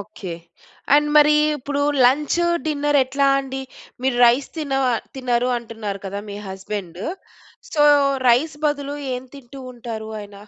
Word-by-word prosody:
Okay. 195 Hz, -4 st, -8 dB, 0.6 s
And 295 Hz, 0 st, +4 dB
మరి 300 Hz, 0 st, +6 dB, 0.2 s
ఇప్పుడు 285 Hz, +1 st, -3 dB, 0.2 s
lunch, 300 Hz, +6 st, +2 dB, 0.2 s
dinner 290 Hz, -1 st, +1 dB
ఎట్లా 275 Hz, +2 st, 0 dB
అండి? 265 Hz, 0 st, -6 dB, 0.4 s
మీరు 260 Hz, -2 st, +1 dB
రైస్ 245 Hz, +4 st, +2 dB
తిన 295 Hz, -4 st, -4 dB, 0.4 s
తినరు 250 Hz, -1 st, 0 dB
అంటున్నారు 220 Hz, -4 st, -6 dB
కదా 200 Hz, +1 st, -4 dB
మీ 200 Hz, -, -6 dB
హస్బండు. 190 Hz, -1 st, -6 dB, 0.7 s
సొ, 295 Hz, -, +2 dB, 0.5 s
రైస్ 290 Hz, +6 st, +3 dB
బదులు 285 Hz, -1 st, -2 dB, 0.2 s
ఏం 250 Hz, +1 st, -4 dB
తింటూ 275 Hz, 0 st, -12 dB
ఉంటారు 225 Hz, -2 st, -7 dB
ఆయన? 205 Hz, -1 st, -11 dB
255 Hz, 130 wpm, -21 LUFS, 220-285 Hz, 0.7 s, మరి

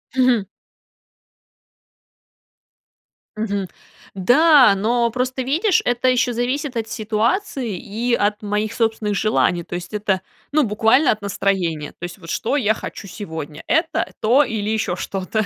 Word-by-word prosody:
Мгм. 250 Hz, -5 st, +3 dB, 2.9 s
Мгм. 200 Hz, -3 st, -2 dB, 0.5 s
Да, 255 Hz, -, +5 dB
но 235 Hz, +4 st, +1 dB
просто, 255 Hz, +2 st, -2 dB
видишь, 330 Hz, -, +2 dB
это 245 Hz, +1 st, +2 dB
ещё 250 Hz, -1 st, +2 dB
зависит 255 Hz, +3 st, -2 dB
от 225 Hz, -1 st, -3 dB
ситуации 225 Hz, -, -1 dB
и 230 Hz, +7 st, -3 dB
от 210 Hz, -2 st, +1 dB
моих 210 Hz, +1 st, -2 dB
собственных 220 Hz, -2 st, 0 dB
желаний, 195 Hz, -4 st, +1 dB
то -, -, -10 dB
есть 180 Hz, +3 st, -7 dB
это, 205 Hz, -3 st, 0 dB, 0.3 s
ну, 305 Hz, +1 st, +3 dB
буквально 225 Hz, +7 st, +3 dB
от 215 Hz, -, -3 dB
настроения- 185 Hz, -6 st, -1 dB
то -, -, -12 dB
есть 175 Hz, +1 st, -6 dB
вот 165 Hz, -3 st, -12 dB
что 270 Hz, +6 st, -1 dB
я 220 Hz, -6 st, +2 dB
хочу 210 Hz, -, -8 dB
сегодня: 160 Hz, -6 st, -7 dB
это, 320 Hz, +1 st, 0 dB
то 250 Hz, +7 st, +4 dB
или 215 Hz, -4 st, -3 dB
ещё 215 Hz, -5 st, -1 dB
что-то. 195 Hz, +3 st, -2 dB
220 Hz, 135 wpm, -20 LUFS, 200-250 Hz, 2.9 s, Да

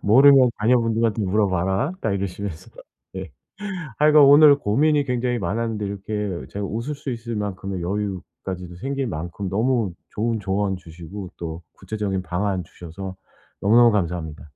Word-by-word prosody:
"모르면 130 Hz, +3 st, +7 dB
자녀분들한테 115 Hz, -1 st, +2 dB
물어봐라." 95 Hz, -, +1 dB
딱 110 Hz, -, 0 dB
이러시면서. 100 Hz, -3 st, -4 dB, 0.5 s
예. -, -, -6 dB, 0.7 s
하여간 150 Hz, 0 st, +6 dB
오늘 145 Hz, +1 st, +8 dB
고민이 145 Hz, +6 st, +2 dB
굉장히 125 Hz, -1 st, -1 dB
많았는데 110 Hz, 0 st, -2 dB
이렇게 100 Hz, -1 st, -4 dB
제가 100 Hz, 0 st, -4 dB
웃을 115 Hz, +9 st, -3 dB
수 145 Hz, -1 st, -6 dB
있을 115 Hz, -1 st, -5 dB
만큼의 100 Hz, -3 st, -4 dB
여유까지도 95 Hz, -2 st, -5 dB
생길 135 Hz, +6 st, -3 dB
만큼 85 Hz, +2 st, -5 dB
너무 110 Hz, 0 st, +1 dB, 0.2 s
좋은 115 Hz, +1 st, -1 dB
조언 100 Hz, -1 st, -1 dB
주시고 90 Hz, +2 st, -9 dB
또 85 Hz, 0 st, -6 dB
구체적인 100 Hz, -3 st, -3 dB
방안 95 Hz, +1 st, -1 dB
주셔서 95 Hz, +3 st, -9 dB, 0.4 s
너무너무 115 Hz, +3 st, +6 dB
감사합니다. 85 Hz, -6 st, -2 dB
105 Hz, 350 characters per minute, -23 LUFS, 95-120 Hz, 0.7 s, 오늘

